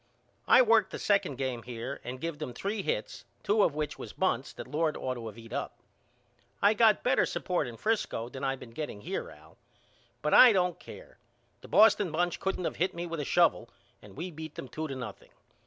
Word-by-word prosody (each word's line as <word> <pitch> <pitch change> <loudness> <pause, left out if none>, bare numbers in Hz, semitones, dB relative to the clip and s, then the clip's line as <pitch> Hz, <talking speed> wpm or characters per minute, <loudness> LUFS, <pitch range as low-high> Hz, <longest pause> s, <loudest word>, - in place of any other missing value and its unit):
I 255 - +7
worked 225 -4 +4
the - - -6
second 200 -9 +1
game 130 -2 -3
here 120 +3 -6
and 125 +1 -6
give 165 0 -4
them 120 - -6
three 200 - -2
hits - - -3 0.2
two 210 +1 +3
of 155 - +2
which 150 -1 -3
was - - -8
bunts 145 -8 0
that - - -8
Lord 155 0 0
ought 130 - -2
to 115 -3 -6
of 110 - -13
eat 115 0 -11
up. 140 - -4 0.8
I 205 +2 +5
got 220 0 +4
better 255 +1 +3
support 175 -6 -1
in 115 -1 -8
Frisco 210 - -1
than 130 +2 -8
I 135 0 0
been 125 -3 -12
getting 115 -5 -6
here - - -4
Al. - - -17 0.6
But 150 - +1
I 250 -3 +9
don't 180 -2 +1
care. - - -13 0.4
The - - -12
Boston 210 -4 +5
bunch 175 +2 0
couldn't 190 -2 -2
of - - -3
hit 180 +1 0
me 170 +1 -4
with 165 -2 -5
a 145 - -2
shovel - - +2 0.3
and 100 -2 -15
we 175 +4 -5
beat 155 -1 -9
them - - -7
two 155 +4 -4
to 135 - -5
nothing. 130 - -8
155 Hz, 215 wpm, -29 LUFS, 130-195 Hz, 0.8 s, I